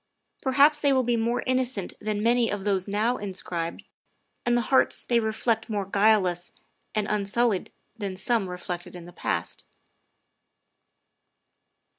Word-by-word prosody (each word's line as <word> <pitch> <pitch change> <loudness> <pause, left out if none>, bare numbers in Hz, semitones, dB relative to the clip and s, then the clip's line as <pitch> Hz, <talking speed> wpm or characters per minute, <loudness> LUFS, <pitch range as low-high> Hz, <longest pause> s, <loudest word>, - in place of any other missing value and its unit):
Perhaps 285 +3 +4
they 285 -1 +3
will 260 -1 +3
be 240 0 +1
more 235 +2 0
inno 255 0 +2
cent 230 -7 -3
than 210 0 -2
many 235 0 +3
of 205 -1 -3
those 195 -2 0
now 215 +5 +1
inscribed, 180 -4 -4 0.6
and 240 0 +4
the - - +2
hearts 265 - +3
they 235 -1 +3
reflect 220 +1 -1
more 205 -3 -1
guileless 195 -3 +2 0.4
and 215 -1 +1
unsullied 210 0 0 0.2
than 200 -4 -4
some 195 0 0
reflected 180 0 -6
in 175 -1 -9
the 175 - -12
past. - - -3
215 Hz, 140 wpm, -26 LUFS, 190-240 Hz, 0.6 s, Perhaps